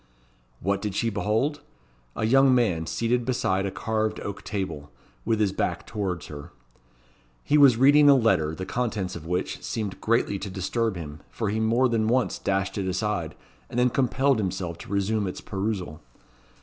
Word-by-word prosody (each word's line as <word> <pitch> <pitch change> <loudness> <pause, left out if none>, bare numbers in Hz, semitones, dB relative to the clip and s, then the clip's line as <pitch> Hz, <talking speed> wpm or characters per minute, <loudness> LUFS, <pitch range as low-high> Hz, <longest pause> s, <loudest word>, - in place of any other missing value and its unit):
What 100 +2 0
did 105 -3 -3
she 115 +1 0
behold? 110 +9 0 0.5
A 110 - -1
young 135 +2 +5
man 90 -10 +1
seated 120 +5 0
beside 100 -6 0
a - - -1
carved 110 +1 -1
oak 100 - -6
table, 95 -8 -4 0.4
with 110 -1 +1
his 105 -3 +2
back - - -2
towards 95 -5 -3
her. 70 -1 -9 0.9
He 150 - +1
was 140 -6 +7
reading 145 +3 +6
a 140 - +8
letter, 80 - +2
the 95 - -5
contents 110 -6 -2
of 80 -1 -8
which 90 +2 -2
seemed 105 -4 -4
greatly 110 -3 +1
to 100 - -5
disturb 105 +4 -1
him, 75 -3 -7
for 110 -4 -2
he 110 - -1
more 115 +4 +3
than 115 -2 +1
once 125 +2 +1
dashed 95 0 -1
it 95 - -2
aside, 95 -3 -2 0.3
and - - -6
then 125 0 +3
compelled 135 0 +2
himself 90 -4 -3
to - - -10
resume 100 +1 0
its 90 - -5
perusal. 95 -6 -4
105 Hz, 175 wpm, -26 LUFS, 95-120 Hz, 0.9 s, a